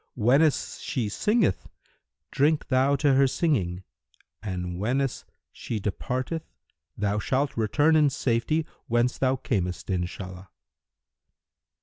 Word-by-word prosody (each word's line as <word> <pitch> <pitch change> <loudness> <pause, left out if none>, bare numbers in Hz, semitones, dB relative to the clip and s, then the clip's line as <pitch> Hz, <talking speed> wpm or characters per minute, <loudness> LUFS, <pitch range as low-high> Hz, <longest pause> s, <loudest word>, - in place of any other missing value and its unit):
Whenas 135 +7 +2
she 115 -6 -2
singeth, 210 - +1 0.6
drink 150 +2 +1
thou 135 +1 +3
to 140 -1 +3
her 135 +1 +5
singing, 100 - 0 0.6
and 90 -3 -4
whenas 130 +5 -1 0.3
she 110 - -5
departeth 130 - -3 0.6
thou 105 0 0
shalt 135 +7 0
return 145 +8 +3
in 150 -2 +5
safety 140 +3 0 0.2
whence 120 +2 +1
thou 130 0 +2
camest, 95 -8 -2
Inshallah!" 90 +1 -4
125 Hz, 105 wpm, -26 LUFS, 100-140 Hz, 0.6 s, her